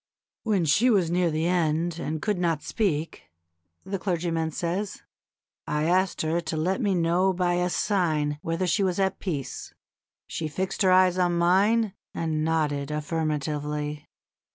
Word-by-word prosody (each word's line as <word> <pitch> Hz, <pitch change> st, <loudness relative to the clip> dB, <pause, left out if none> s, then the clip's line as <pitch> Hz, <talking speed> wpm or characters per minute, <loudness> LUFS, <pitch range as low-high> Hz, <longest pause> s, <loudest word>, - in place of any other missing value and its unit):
"When 205 Hz, -6 st, +1 dB
she 210 Hz, -, +4 dB
was 185 Hz, -7 st, +3 dB
near 175 Hz, 0 st, +2 dB
the 155 Hz, +1 st, -1 dB
end, 170 Hz, -1 st, 0 dB
and 155 Hz, -1 st, -3 dB
could 210 Hz, -4 st, 0 dB
not 165 Hz, -4 st, 0 dB
speak," 165 Hz, -8 st, -2 dB, 0.6 s
the 195 Hz, 0 st, -3 dB
clergyman 170 Hz, -3 st, -1 dB
says, 180 Hz, +6 st, -3 dB, 0.6 s
"I 150 Hz, 0 st, 0 dB
asked 180 Hz, +2 st, +1 dB
her 165 Hz, +2 st, 0 dB
to 160 Hz, -1 st, -4 dB
let 185 Hz, +10 st, 0 dB
me 200 Hz, -4 st, +1 dB
know 175 Hz, +3 st, +2 dB
by 180 Hz, -1 st, +1 dB
a 180 Hz, 0 st, +1 dB
sign 155 Hz, -7 st, 0 dB
whether 165 Hz, +1 st, -1 dB
she 190 Hz, +3 st, +1 dB
was 185 Hz, -1 st, 0 dB
at 190 Hz, -1 st, 0 dB
peace. 150 Hz, -9 st, -5 dB, 0.5 s
She 160 Hz, -, -4 dB
fixed 185 Hz, +5 st, -3 dB
her 190 Hz, -2 st, +5 dB
eyes 185 Hz, 0 st, +4 dB
on 175 Hz, -1 st, +2 dB
mine 195 Hz, +5 st, +3 dB, 0.2 s
and 155 Hz, -2 st, -1 dB
nodded 150 Hz, -3 st, 0 dB
affirmatively. 150 Hz, -1 st, -2 dB
170 Hz, 155 wpm, -26 LUFS, 155-185 Hz, 0.6 s, her